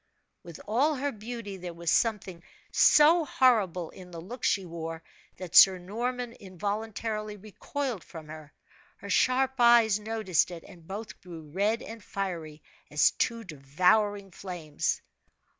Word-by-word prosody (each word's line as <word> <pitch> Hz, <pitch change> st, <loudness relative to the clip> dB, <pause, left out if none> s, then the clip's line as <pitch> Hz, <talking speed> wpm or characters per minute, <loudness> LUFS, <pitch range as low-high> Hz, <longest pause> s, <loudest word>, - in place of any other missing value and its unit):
With 170 Hz, -2 st, -11 dB
all 270 Hz, +9 st, +2 dB
her 285 Hz, +1 st, -2 dB
beauty 220 Hz, -2 st, -7 dB
there 175 Hz, -2 st, -7 dB
was 170 Hz, -1 st, -1 dB
something 195 Hz, -6 st, 0 dB, 0.3 s
so 320 Hz, +3 st, +6 dB
horrible 210 Hz, -, +2 dB
in 185 Hz, -1 st, -13 dB
the 170 Hz, -1 st, -8 dB
look 230 Hz, +9 st, -9 dB
she 195 Hz, -2 st, +1 dB
wore, 165 Hz, -1 st, -6 dB, 0.3 s
that 180 Hz, -2 st, -8 dB
Sir 190 Hz, -1 st, +9 dB
Norman 240 Hz, +6 st, -4 dB
involuntarily 210 Hz, +2 st, -4 dB
recoiled 215 Hz, -, -5 dB
from 160 Hz, -2 st, -11 dB
her. 155 Hz, -1 st, -10 dB, 0.5 s
Her -, -, -8 dB
sharp 260 Hz, +1 st, +2 dB
eyes 235 Hz, -3 st, +5 dB
noticed 210 Hz, -6 st, 0 dB
it, 170 Hz, -2 st, -9 dB
and 170 Hz, -2 st, -15 dB
both 210 Hz, +3 st, -7 dB
grew 160 Hz, -4 st, -11 dB
red 210 Hz, +7 st, 0 dB
and 225 Hz, -1 st, -9 dB
fiery 165 Hz, -6 st, -5 dB, 0.3 s
as 150 Hz, -, +4 dB
two 230 Hz, 0 st, -2 dB
devouring 190 Hz, +6 st, +1 dB
flames. 175 Hz, -5 st, -4 dB
200 Hz, 140 wpm, -28 LUFS, 170-230 Hz, 0.5 s, Sir